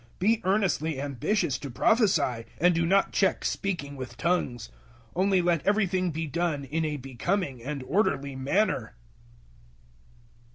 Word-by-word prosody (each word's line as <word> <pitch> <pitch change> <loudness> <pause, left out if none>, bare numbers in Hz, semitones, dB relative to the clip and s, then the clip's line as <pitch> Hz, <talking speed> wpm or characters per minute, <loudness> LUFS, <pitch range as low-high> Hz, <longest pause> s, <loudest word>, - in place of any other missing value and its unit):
Be 220 +4 +2
earnestly 180 -7 +1
ambitious 145 - -1
to 140 - -6
prophesy, 145 - +2
and 175 +2 +5
do 165 0 +1
not 195 +2 +3
check 190 -2 +1
speaking 155 -8 -2
with 130 -2 -8
tongues; 130 -9 -1 0.4
014:040 - - -34
only 190 0 +3
let 170 -4 +1
everything 190 -3 +2
be 160 0 -3
done 160 -1 -1
in 160 +4 -2
a 150 -1 -2
becoming 135 - -2
and 140 +2 -5
orderly 140 -4 0
manner. 135 - 0
165 Hz, 135 wpm, -27 LUFS, 140-190 Hz, 0.4 s, and